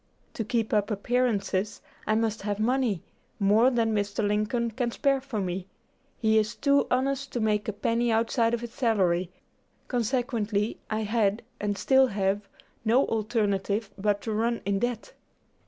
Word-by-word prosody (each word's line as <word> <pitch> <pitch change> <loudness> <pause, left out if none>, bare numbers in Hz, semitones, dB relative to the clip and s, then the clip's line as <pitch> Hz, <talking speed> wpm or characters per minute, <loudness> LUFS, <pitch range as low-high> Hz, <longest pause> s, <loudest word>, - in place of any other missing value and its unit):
To 225 - -3
keep 225 +1 -1
up 210 -1 +2
appearances, 210 -3 0 0.3
I 215 - +3
must 220 -1 0
have 205 0 -2
money 235 -5 +1 0.4
more 215 +5 +5
than 230 -3 +1
Mr. 205 0 0
Lincoln 215 +3 0
can 240 +2 -1
spare 275 +2 +1
for 260 -5 -4
me. 185 -1 -3 0.5
He 220 -1 +3
is 215 +2 -1
too 280 0 +2
honest 270 +1 0
to 245 - -1
make 210 -1 +1
a - - +1
penny 230 +3 0
outside 230 +1 +2
of 235 - -7
his 240 -1 -7
salary; 185 -8 +1 0.6
consequently 230 -3 -1
I 215 0 -1
had, 215 0 +1 0.2
and 205 -1 -1
still 265 +3 +4
have, 195 -1 -1 0.3
no 235 +4 +4
alternative 210 -2 -1
but 205 +1 0
to 225 - -3
run 230 +2 0
in 200 0 +1
debt." 240 0 -3
220 Hz, 155 wpm, -27 LUFS, 205-240 Hz, 0.6 s, more